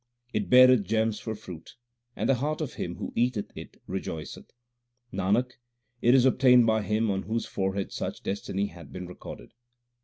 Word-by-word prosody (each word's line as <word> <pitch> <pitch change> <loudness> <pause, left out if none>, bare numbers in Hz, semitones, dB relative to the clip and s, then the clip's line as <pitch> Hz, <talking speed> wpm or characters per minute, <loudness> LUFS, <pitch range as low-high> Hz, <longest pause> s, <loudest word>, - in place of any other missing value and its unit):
It - - -1
beareth 125 -2 +8
gems 110 +2 0
for 110 -1 -4
fruit, 90 -4 -11 0.4
and - - -1
the - - +5
heart 155 +2 -1
of 155 -5 -4
him - - -4
who - - -6
eateth 120 -3 -1
it - - -10
rejoiceth. 85 -4 -6 0.6
Nanak, 100 +7 +1 0.5
it 120 +2 +5
is 130 -1 +5
obtained 125 -2 +6
by 110 -1 +2
him 105 +1 0
on 95 0 -1
whose 115 +3 -2
forehead 95 0 -2
such - - -5
destiny 100 0 -2
hath 85 -3 -10
been 90 0 -6
recorded. 90 - -10
110 Hz, 165 wpm, -27 LUFS, 95-125 Hz, 0.6 s, beareth